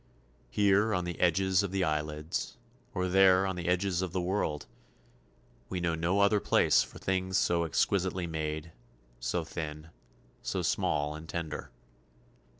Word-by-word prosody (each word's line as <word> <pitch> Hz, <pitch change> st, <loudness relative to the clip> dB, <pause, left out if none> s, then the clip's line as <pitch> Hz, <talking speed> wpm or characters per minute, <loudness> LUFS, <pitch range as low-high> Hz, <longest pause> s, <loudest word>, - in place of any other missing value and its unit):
Here 100 Hz, -, +3 dB
on 90 Hz, -, 0 dB
the 90 Hz, -1 st, -5 dB
edges 95 Hz, +2 st, +3 dB
of 100 Hz, -, -2 dB
the 95 Hz, 0 st, 0 dB
eyelids, 75 Hz, 0 st, -2 dB, 0.4 s
or 90 Hz, 0 st, 0 dB
there 95 Hz, 0 st, +5 dB
on 95 Hz, -1 st, -2 dB
the 90 Hz, -1 st, -5 dB
edges 90 Hz, 0 st, +1 dB
of 90 Hz, -2 st, -3 dB
the 95 Hz, -, 0 dB
world 90 Hz, -5 st, -1 dB, 1.0 s
we 90 Hz, -, -2 dB
know 85 Hz, -1 st, 0 dB
no 85 Hz, +5 st, +1 dB
other 100 Hz, +1 st, +4 dB
place -, -, +4 dB
for -, -, -7 dB
things 95 Hz, 0 st, -1 dB
so 85 Hz, -2 st, +2 dB
exquisitely 95 Hz, +3 st, 0 dB
made, 80 Hz, 0 st, -4 dB, 0.5 s
so 85 Hz, +8 st, -1 dB
thin, 80 Hz, -1 st, -6 dB, 0.5 s
so -, -, -2 dB
small 75 Hz, 0 st, 0 dB
and 80 Hz, +1 st, -9 dB
tender. 80 Hz, -3 st, -4 dB
90 Hz, 150 wpm, -30 LUFS, 80-95 Hz, 1.0 s, there